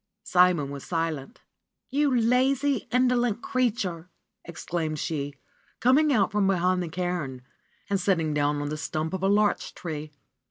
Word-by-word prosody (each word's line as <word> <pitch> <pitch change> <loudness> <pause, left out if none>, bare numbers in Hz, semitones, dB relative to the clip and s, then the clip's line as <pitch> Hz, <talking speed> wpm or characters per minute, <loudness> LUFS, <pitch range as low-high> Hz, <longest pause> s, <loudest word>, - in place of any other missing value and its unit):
Simon 180 -8 +3
was 140 -1 -7
silent. 165 - -3 0.5
"You 290 +2 +2
lazy, 260 +4 +2
indolent 245 -3 +2
creature 205 -9 -1 0.2
!" - - -57
exclaimed 165 -2 -4
she, 145 -2 -3 0.4
coming 285 +5 +4
out 205 -8 +2
from 205 -1 +2
behind 185 -1 +2
the 175 - -4
cairn 170 -7 -3 0.4
and 200 -1 0
sitting 165 -6 +1
down 145 0 0
on 145 - -3
the 155 - -3
stump 155 +1 -3
of 190 - -3
a 195 - +2
larch 205 +1 +1
tree. 155 -3 -6
180 Hz, 150 wpm, -26 LUFS, 155-235 Hz, 0.5 s, coming